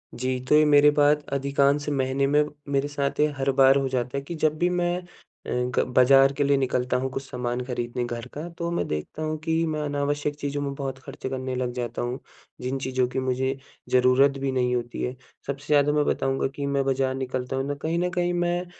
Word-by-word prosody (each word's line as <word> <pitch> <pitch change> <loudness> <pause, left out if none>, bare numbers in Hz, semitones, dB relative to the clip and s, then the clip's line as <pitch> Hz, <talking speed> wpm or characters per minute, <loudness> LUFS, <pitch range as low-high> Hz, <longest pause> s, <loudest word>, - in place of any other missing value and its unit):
जी, 130 +1 -1
तो 150 - +6
ये 155 0 +6
मेरी 145 0 +6
बात 145 0 +4
अधिकांश 140 +1 +1
महीने 135 0 0
में 150 +1 +4 0.3
मेरे 140 +1 +1
साथ 140 -1 -2
ये 150 - +5
हर 135 0 +1
बार 135 0 +6
हो 135 -1 0
जाता 125 +1 -2
है - - -2
कि 170 - -4
जब 155 0 +1
भी 175 +2 +2
मैं 175 0 0 0.5
अ, - - -5
ग 125 0 0 0.2
बाज़ार 135 +2 +6
के 145 - +2
लिए 140 0 +3
निकलता 125 -1 0
हूँ 130 +1 -2
कुछ 135 +1 -4
सामान 125 -1 -3
खरीदने 120 -1 -3
घर 120 0 -5
का 155 +4 -5
तो 170 0 -2
मैं 170 - -1
देखता 75 - -4
हूँ 155 0 -2
कि 165 0 +1
मैं 155 -1 -2
अनावश्यक 145 0 -1
चीज़ों 145 0 -2
में 140 -1 -2
बहुत 135 -1 -4
खर्च 135 0 -10
करने 130 -1 -3
लग 125 -1 -1
जाता 120 -1 -4
हूँ, 120 +2 -3 0.4
जिन 130 +2 -2
चीज़ों 130 -1 +1
की 125 +1 -3
मुझे 130 +1 -1 0.3
ज़रूरत 130 +2 +4
भी 135 -1 -1
नहीं 125 -1 +1
होती 120 0 -4
है। 125 +1 -2 0.3
सबसे 140 0 -5
ज़्यादा 145 0 +4
मैं 150 - +3
बताऊँगा 135 0 0
कि 140 - -3
मैं 140 -1 +1
बाज़ार 135 -1 +1
निकलता 130 0 -3
हूँ 135 - -1
ना, 145 - -1
कहीं 160 +4 -2
न 180 0 +1
कहीं 175 0 +1
मैं 175 +1 0
135 Hz, 225 wpm, -25 LUFS, 130-145 Hz, 0.5 s, तो